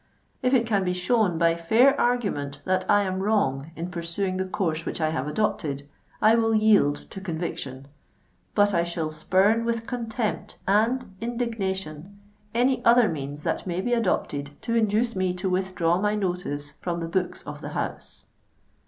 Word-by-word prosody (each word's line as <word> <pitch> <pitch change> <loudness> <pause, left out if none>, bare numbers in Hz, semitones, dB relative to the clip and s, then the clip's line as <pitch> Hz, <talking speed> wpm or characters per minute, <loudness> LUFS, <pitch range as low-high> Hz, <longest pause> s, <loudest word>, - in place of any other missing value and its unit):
If 255 +1 +3
it 235 -2 +3
can 205 -4 +1
be 180 -1 0
shown 185 -1 +2
by 165 0 +4
fair 225 +11 +4
argument 145 -13 -1
that 185 0 0
I 205 0 +5
am 190 -1 -2
wrong 165 -9 +1
in 170 +2 -5
pursuing 175 +2 -2
the 190 - -1
course 165 -5 -1
which - - -4
I 155 -1 +1
have 145 -3 -2
adopted, 150 -6 -1 0.4
I 215 +1 +7
will 225 -1 +3
yield 210 -10 +3
to 195 - -7
conviction; 160 -7 -4 0.7
but 205 -1 +4
I 170 -1 +3
shall 170 -2 -2
spurn 190 +8 +2
with 230 -1 -1
contempt 230 -3 -3
and 225 +6 +2 0.2
indignation 200 -7 -3 0.3
any 250 +3 +1
other 235 -1 +6
means 145 -2 -5
that - - -2
may 175 0 -2
be 245 +6 0
adopted 145 -10 -1
to 230 - -2
induce 225 +1 +2
me 185 -1 0
to 185 +1 -2
withdraw 185 -2 +1
my 210 0 +1
notice 175 -7 -3
from 170 -1 -2
the 165 - -3
books 180 +1 -2
of - - -8
the - - -5
House." - - -5
190 Hz, 170 wpm, -25 LUFS, 165-220 Hz, 0.7 s, I